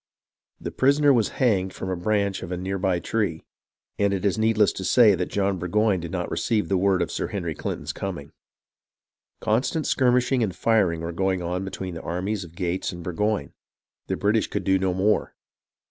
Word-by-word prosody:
The - - -5
prisoner 140 +2 +4
was 115 -5 +2
hanged 95 -7 +2
from 95 - -5
a - - 0
branch 100 +1 0
of 95 - -7
a 90 - -2
near 95 +2 -3
by 90 -1 +1
tree, 95 -6 -2 0.6
and 100 -1 +2
it 95 - -3
is 100 - +2
needless 110 -2 +3
to 95 - -6
state 105 -1 +5
that 90 - 0
John 100 -2 0
Burgoyne 100 +2 +1
did 85 0 -6
not 90 0 -3
receive 110 -3 0
the 95 - +2
word 95 -2 +2
of - - -5
Sir - - -2
Henry - - -3
Clinton's - - -4
coming. 85 -8 -5 1.1
Constant 130 +8 0
skirmishing 125 0 +2
and 100 -5 -1
firing 95 -5 +2
were 85 +1 -3
going 95 +1 0
on 90 +2 -2
between 95 -1 -5
the 80 - -6
armies 95 +4 -3
of 85 -1 -13
Gates 90 +1 -2
and 90 -2 -8
Burgoyne. 90 -2 -1 0.5
The - - -1
British 105 +2 +1
could - - -3
do 95 0 +2
no 95 -1 0
more. 105 +3 +1
95 Hz, 190 wpm, -24 LUFS, 90-110 Hz, 1.1 s, state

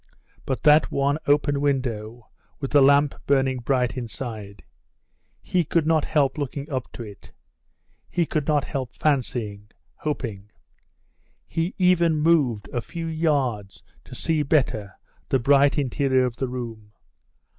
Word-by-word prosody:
But 130 - -2
that 150 0 +5
one 140 +2 +1
open 145 0 +2
window, 120 -5 -2 0.3
with 135 - -4
the 145 - +6
lamp 140 +1 +5
burning 135 -2 +2
bright 125 0 0
inside 110 -4 -7 0.8
he 180 -1 +1
could 165 +1 0
not 160 -2 +2
help 150 -1 +1
looking 140 0 -4
up 130 -2 -3
to 120 - -7
it 105 -3 -12 0.8
he 175 - +1
could 155 -2 -2
not 150 -3 +2
help 130 -3 -5
fancying 115 -8 -1 0.3
hoping. 110 -9 -5 1.0
He 165 +3 -2
even 175 -3 +3
moved 150 -9 +2
a 120 - -2
few 165 +6 -6
yards 140 - -1 0.2
to - - -11
see 160 -2 0
better 125 -9 0 0.3
the - - +3
bright 140 +3 +4
interior 130 -1 +1
of 120 -2 -4
the 130 - -2
room. 115 -4 -7
135 Hz, 135 wpm, -24 LUFS, 120-150 Hz, 1.0 s, the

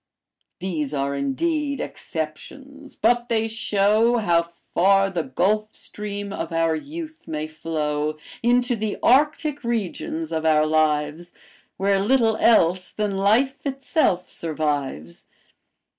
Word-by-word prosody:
These 155 -6 -3
are 140 0 -1
indeed 280 - -1
exceptions; 275 - -7
but 240 +2 +2
they 225 -1 +1
show 220 +1 +2
How 175 -6 +3
far 195 +3 +1
the 175 -3 -1
gulf 210 +10 0
stream 205 -1 -6
of 165 -3 -4
our 165 0 +2
youth 315 - -8
may 155 -1 -3
flow 155 -1 -2 0.2
Into 245 +1 +2
the 215 -1 -3
Arctic 295 +2 +3
regions 190 -8 -3
of 160 -1 -1
our 155 -1 +4
lives, 155 +2 0 0.4
Where 195 0 +2
little 225 +1 +3
else 185 -5 +3
than 210 -2 -2
life 225 +8 +2
itself 270 - 0
survives. 145 - -3
195 Hz, 115 wpm, -23 LUFS, 160-240 Hz, 0.4 s, our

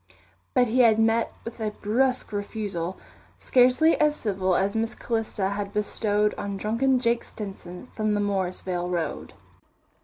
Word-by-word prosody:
But 250 -2 +4
he 250 +3 +1
had 230 -3 +6
met 225 +1 +2
with 230 +1 -7
a 220 -1 -1
brusque 250 +6 0
refusal, 200 -4 -3 0.4
scarcely 255 +6 +4
as 300 -1 +3
civil 190 -7 0
as 195 +3 +1
Miss 225 +1 -1
Calista 225 -4 -2
had 200 0 -4
bestowed 210 0 +1
on 200 -1 -4
drunken 230 +6 +1
Jake 235 -1 +1
Stinson 195 -1 -9
from 215 -1 0
the - - 0
Morrisvale 185 -3 -1
Road. 175 -2 -3
210 Hz, 145 wpm, -25 LUFS, 195-235 Hz, 0.4 s, had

